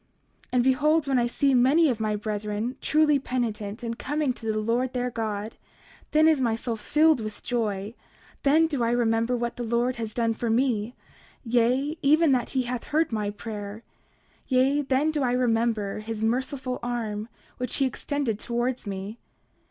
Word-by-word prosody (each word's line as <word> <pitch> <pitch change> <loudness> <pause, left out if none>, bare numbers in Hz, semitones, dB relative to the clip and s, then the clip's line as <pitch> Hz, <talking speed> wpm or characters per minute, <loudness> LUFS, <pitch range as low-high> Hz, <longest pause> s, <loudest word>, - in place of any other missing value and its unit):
29:10 - - -35
And 250 -1 +3
behold, 295 +4 +3
when 265 -2 +2
I 240 - +2
see 275 +3 +1
many 270 +7 +5
of 245 -5 0
my 215 -1 0
brethren 210 +2 -3
truly 305 -2 +3
penitent, 230 -4 -3
and 230 0 -4
coming 295 -1 0
to 225 -2 -3
the 215 - -2
Lord 235 +4 0
their 250 0 -1
God, 215 -1 -4 0.5
then 310 +1 +4
is 310 -4 +4
my 230 -3 +2
soul 230 0 -3
filled 300 +6 +3
with 215 -1 -7
joy; 215 -4 -2 0.5
then 310 +4 +4
do 290 -6 -2
I 230 - +2
remember 235 0 +1
what 240 0 -3
the 245 - -3
Lord 240 +2 0
has 225 -2 -4
done 230 0 0
for 230 +1 -3
me, 235 -1 +1 0.5
yea, 250 +6 +1
even 305 +2 +4
that 250 -3 +1
he 260 - +3
hath 245 0 -4
heard 315 -1 +1
my 210 -2 -1
prayer; 210 0 -7 0.6
yea, 265 +2 +3
then 275 +3 +1
do 300 -2 -1
I 245 -2 +1
remember 225 -4 +1
his 220 0 -5
merciful 255 +2 -1
arm 230 -3 -3 0.3
which 250 -1 -2
he 275 - +2
extended 260 -3 -2
towards 240 0 -2
me. 200 +3 -5
240 Hz, 175 wpm, -26 LUFS, 220-265 Hz, 0.6 s, many